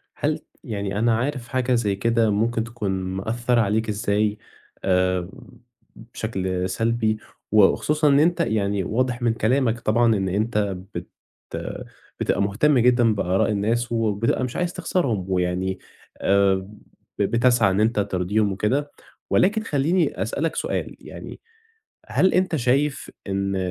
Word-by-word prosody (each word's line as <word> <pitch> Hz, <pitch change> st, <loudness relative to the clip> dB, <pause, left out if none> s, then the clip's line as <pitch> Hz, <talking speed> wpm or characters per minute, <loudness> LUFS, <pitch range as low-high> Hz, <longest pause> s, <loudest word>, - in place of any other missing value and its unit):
هل -, -, -1 dB, 0.2 s
يعني 100 Hz, -1 st, -3 dB
أنا 115 Hz, -1 st, +3 dB
عارف 130 Hz, 0 st, -3 dB
حاجة 130 Hz, +1 st, 0 dB
زي 105 Hz, -4 st, 0 dB
كده 115 Hz, +2 st, +2 dB
ممكن 115 Hz, +2 st, +1 dB
تكون 115 Hz, -4 st, -4 dB
مأثّرة 110 Hz, +6 st, -1 dB
عليك 110 Hz, +2 st, 0 dB
إزاي 105 Hz, 0 st, 0 dB, 0.5 s
آآ، 90 Hz, -1 st, +1 dB, 0.7 s
بشكل 95 Hz, -5 st, -3 dB
سلبي 115 Hz, +2 st, 0 dB, 0.4 s
و 105 Hz, -1 st, +6 dB
وخصوصًا 150 Hz, +8 st, +2 dB
إن 140 Hz, 0 st, +5 dB
أنت 170 Hz, +2 st, +2 dB
يعني 100 Hz, -3 st, 0 dB
واضح 125 Hz, +3 st, -1 dB
من 120 Hz, -1 st, +3 dB
كلامك 120 Hz, 0 st, +1 dB
طبعًا 115 Hz, 0 st, +3 dB
إن 95 Hz, -1 st, -1 dB
أنت 105 Hz, 0 st, 0 dB, 0.2 s
بت -, -, -5 dB, 1.1 s
بتبقى -, -, +1 dB
مُهتم 120 Hz, +9 st, +2 dB
جدًا 120 Hz, -2 st, +4 dB
بآراء 95 Hz, 0 st, +1 dB
الناس، 115 Hz, +4 st, 0 dB
وبتبقى 115 Hz, +2 st, 0 dB
مش 125 Hz, -, -5 dB
عايز 175 Hz, -1 st, -1 dB
تخسرهم 125 Hz, -, -1 dB
ويعني 90 Hz, +1 st, -1 dB, 0.4 s
آآ، 100 Hz, 0 st, +4 dB, 0.6 s
ب -, -, +2 dB
بتسعى 115 Hz, 0 st, +3 dB
إن 95 Hz, +2 st, +1 dB
أنت 110 Hz, 0 st, +2 dB
ترضيهم 100 Hz, +1 st, 0 dB
وكده، 135 Hz, +9 st, -1 dB, 0.4 s
ولكن 210 Hz, +4 st, +3 dB
خلّيني 155 Hz, -, 0 dB
أسأل 110 Hz, +8 st, -3 dB
لك 165 Hz, -, -1 dB
سؤال، -, -, -3 dB
يعني -, -, -10 dB, 0.7 s
هل 190 Hz, -, +2 dB
أنت 185 Hz, -3 st, +2 dB
شايف 135 Hz, +3 st, 0 dB, 0.2 s
إن 100 Hz, 0 st, -1 dB
110 Hz, 135 wpm, -23 LUFS, 100-125 Hz, 1.1 s, و